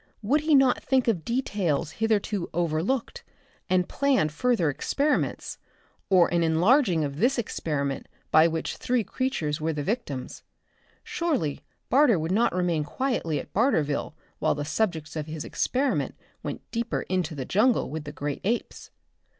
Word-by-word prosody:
Would 280 +8 +2
he 310 -1 +3
not 270 -2 +4
think 260 -2 +1
of 190 -9 +1
details 200 - -1
hitherto 210 -2 0
overlooked 175 +9 -1 0.5
and 180 -1 +2
plan 275 - +2
further 200 +2 +1
experiments, 280 - -1 0.5
or 185 -3 +6
an 170 - +3
enlarging 175 - +3
of 140 -1 -4
this 255 - +2
experiment 145 - -2 0.3
of 160 +1 +6
which 160 0 -3
three 245 -2 0
creatures 170 - -2
were 160 +1 0
the 145 -1 -3
victims? 170 - -4 0.6
Surely 275 - -1 0.3
Barter 260 -6 +5
would 160 +2 -2
not 225 +5 +3
remain 175 -4 0
quietly 165 - -1
at - - -10
Barterville 155 - +1 0.2
while - - +2
the 145 0 -3
subjects 160 -2 -1
of 155 -1 -3
his 155 -1 -5
experiment 265 +1 0 0.3
went - - -5
deeper 235 0 -2
into 180 -4 -2
the 135 -3 -4
jungle 220 - +2
with 155 0 -5
the 145 - -6
great 145 -1 -4
apes. 230 +5 -2
180 Hz, 150 wpm, -26 LUFS, 155-245 Hz, 0.6 s, or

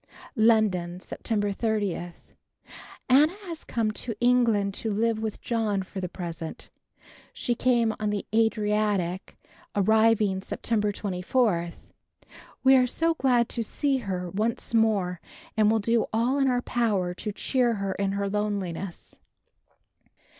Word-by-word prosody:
London, 210 -6 +2
September 205 +1 -2
30. 200 -5 -2 0.9
Anna 290 +6 +5
has 335 -3 -6
come 225 -2 -1
to 225 +1 -5
England 235 -5 +3
to 220 - -3
live 220 +1 0
with 220 -1 -4
John 215 -4 -1
for 190 +1 -7
the 180 - -3
present. 170 -3 -7 0.6
She 240 - -1
came 235 -2 +2
on 215 -1 -1
the 205 -1 -2
Adriatic, 210 -4 0 0.4
arriving 215 -1 +3
September 210 +1 -1
24. 190 -1 0 0.9
We 265 0 +7
are 255 -1 +4
so 330 +6 +1
glad 250 -6 +2
to 235 - -2
see 275 +5 0
her 190 -6 -3
once 220 +5 -2
more 205 -6 +2 0.3
and 215 -1 +4
will 225 - +3
do 230 +1 +1
all 240 +5 +1
in 270 - +3
our 245 -1 +1
power 205 -7 0
to 210 +4 -5
cheer 240 +2 +1
her 195 -1 -2
in 195 0 -1
her 200 0 -1
loneliness. 195 -3 -4
215 Hz, 130 wpm, -26 LUFS, 195-235 Hz, 0.9 s, We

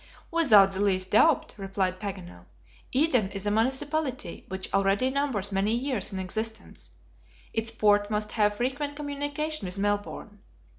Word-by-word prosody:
"Without 220 -13 +6
the 190 - -3
least 185 -2 +1
doubt," 285 +7 +4
replied 190 -1 -2
Paganel. 90 - -7 0.4
"Eden 255 -7 +2
is 195 0 -5
a 205 - +1
municipality 265 +5 -1
which 190 -3 -4
already 195 +6 +2
numbers 260 -8 -1
many 200 +3 +1
years 245 -5 -2
in 195 - -5
existence; 220 +4 -5 0.6
its 225 0 -1
port 205 -2 +2
must 210 0 -2
have 210 -2 +2
frequent 280 +4 -2
communication 290 -3 -3
with 180 +2 -3
Melbourne. 205 +1 -2
210 Hz, 140 wpm, -27 LUFS, 195-265 Hz, 0.6 s, Without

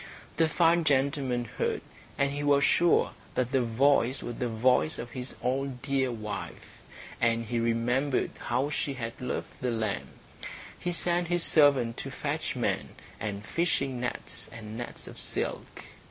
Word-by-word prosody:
The 160 0 +4
fine 170 +1 +4
gentleman 135 -4 +1
heard, - - -2 0.4
and 140 0 +2
he 145 +1 -3
was 140 -1 +4
sure 170 +4 +4 0.2
that 125 -1 0
the 135 - +3
voice 130 +2 +3
was 120 - -5
the 125 - 0
voice 125 +7 +3
of 120 0 -6
his 125 +1 -5
own 130 +1 0
dear 135 -2 +1
wife, 105 -3 -6 0.4
and 115 0 +2
he 120 +2 -1
remembered 120 +4 +1
how 130 +5 0
she 140 -2 -1
had 115 -1 -5
loved 125 - -4
the 125 - 0
lamb. 110 -4 -1 0.7
He 175 - -1
sent 175 0 +1
his 175 0 +2
servant 140 -7 +4
to - - -5
fetch - - -2
men, - - -1 0.2
and 105 -1 -4
fishing 140 - 0
nets 125 - -3
and 110 -1 -8
nets 120 +1 -6
of - - -10
silk. - - -4
130 Hz, 155 wpm, -29 LUFS, 115-145 Hz, 0.7 s, The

